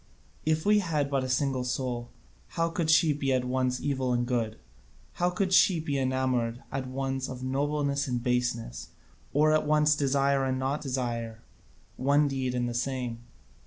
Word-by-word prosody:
If 155 0 +1
we 210 0 +5
had 150 -7 -1
but 135 -1 +1
a 130 - -3
single 130 -1 0
soul, 125 -1 -3 0.5
how 165 0 +2
could 165 -1 -2
she 160 -1 +5
be 140 -1 -1
at 130 -1 +1
once 125 0 0
evil 130 -3 -1
and 120 0 +1
good? 115 -3 -1 0.6
How 175 - +4
could 185 +1 -1
she 185 -2 +5
be 145 -3 -2
enamoured 130 -2 0
at 130 -1 -3
once 135 0 -3
of 130 0 -7
nobleness 140 +1 0
and 120 -2 -2
baseness, 120 - -1 0.4
or 155 +2 +4
at 155 -1 +2
once 150 0 +4
desire 140 -1 +2
and 130 -1 0
not 135 +3 -1
desire 120 -4 -3 0.5
one 145 +3 +3
deed 130 -2 -2
and 120 0 0
the 120 - -3
same? 125 -1 -2
135 Hz, 170 wpm, -28 LUFS, 125-145 Hz, 0.6 s, we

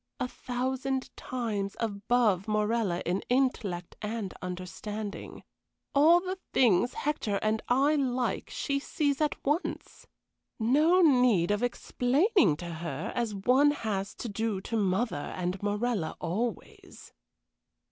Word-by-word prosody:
A 255 - -1
thousand 260 +1 -3
times 215 -6 -3
above 215 -2 +1
Morella 215 -3 0
in 180 +3 0
intellect 230 -9 0
and 215 -2 -4
understanding. 200 +3 -6 0.5
All 315 +5 +6
the 370 +1 -4
things 240 0 +3
Hector 290 -8 -1
and 215 0 +1
I 275 +4 +3
like 255 -4 -1
she 280 -1 -1
sees 285 0 -1
at 300 - +1
once. 300 +5 -2 0.5
No 300 +11 +4
need 245 - +4
of 205 - 0
explaining 245 - +2
to 170 0 -6
her, 155 -3 -4
as 235 -4 -1
one 255 +9 +4
has 210 -9 -2
to 220 -3 -3
to 230 - -4
mother 200 -4 0
and 180 +1 -2
Morella 205 -4 -1
always." 225 +7 -5
230 Hz, 115 wpm, -29 LUFS, 200-260 Hz, 0.5 s, All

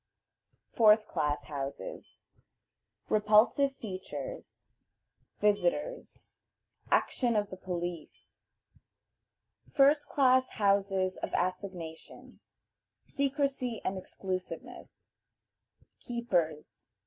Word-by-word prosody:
Fourth 215 -1 +5
Class 145 -1 -1
Houses. 140 - -7 0.8
Repulsive 215 +6 +4
Features. 225 - -7 0.7
Visitors. 210 - 0 0.6
Action 240 -3 +2
of 205 -1 0
the - - -5
Police. 175 -3 -6 1.3
First 290 +1 +4
Class 260 -2 +3
Houses 195 -2 +2
of - - -4
Assignation. 180 -3 -5 0.7
Secrecy 275 -4 -1
and 195 - 0
Exclusiveness. 185 0 -6 0.9
Keepers. 175 -11 -2
205 Hz, 65 wpm, -31 LUFS, 180-255 Hz, 1.3 s, Fourth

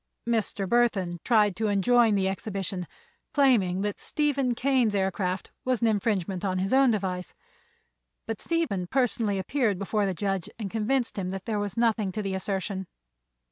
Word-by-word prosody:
Mr. 220 -4 0
Burthon 195 -6 +1
tried 210 -5 +3
to 220 +3 -1
enjoin 220 +2 +4
the 190 -1 +1
exhibition, 195 -2 -3 0.5
claiming 220 -10 +3
that 205 0 -2
Stephen 280 -5 0
Kane's 250 -4 +2
aircraft 190 -1 -1
was 255 -2 0
an - - +3
infringement 200 -3 0
on 185 -2 0
his 190 +5 -1
own 270 -1 +6
device; 185 -5 -2 0.9
but 225 -2 -4
Stephen 280 - -1
personally 225 -4 +1
appeared 215 +1 0
before 200 +1 0
the 190 - -2
judge 195 -1 -2
and 205 -5 -5
convinced 230 +1 0
him 185 -1 -2
there 195 +3 -3
was 205 0 -3
nothing 225 -4 +2
in 215 - -2
the 195 -1 -2
assertion. 190 0 -3
205 Hz, 155 wpm, -27 LUFS, 190-235 Hz, 0.9 s, own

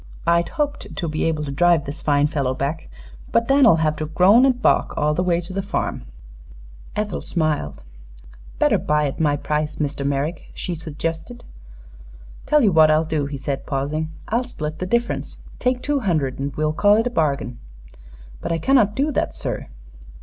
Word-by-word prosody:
"I'd 170 0 +2
hoped 295 -3 -3
to 175 - -3
be 155 0 -1
able 155 -2 0
to 140 - -5
drive 170 +2 +3
this 145 +4 -6
fine 145 -1 +2
fellow 140 -4 -1
back, 140 +5 -3 0.4
but 230 - +2
Dan'll 270 -8 +6
have 155 -1 +1
to 155 - -3
groan 200 - +5
an' 265 - +4
balk 250 - +1
all 150 +1 +2
the 165 - 0
way 175 -2 +1
to 175 +2 -8
the 195 - -1
farm." 195 - -3 0.9
Ethel 210 -2 -2
smiled. 145 - -2 0.7
"Better - - +3
buy 150 0 +1
at 140 - -4
my 150 -2 +2
price, 150 +1 -2
Mr. 145 -2 -3
Merrick," 140 +4 -2
she 180 - -4
suggested. 165 - -5 1.0
"Tell 300 -2 +4
you 210 - +4
what 160 -2 +6
I'll 155 +1 +3
do," 155 -3 -1
he 140 0 -5
said, 135 0 -4
pausing. 150 +3 -2 0.2
"I'll 235 +3 0
split 155 -11 -6
the 185 - -3
difference. 235 +3 -1 0.2
Take 250 0 0
two 290 -1 +1
hundred 155 - -1
and 140 +1 -2
well 155 0 0
call 205 +6 +4
it 225 - +1
a 245 - -1
bargain." 140 - -1 0.8
"But - - -3
I 165 - +1
cannot 215 - +3
do 290 +3 +1
that, - - -1
sir." - - -4
160 Hz, 185 wpm, -22 LUFS, 150-205 Hz, 1.0 s, Dan'll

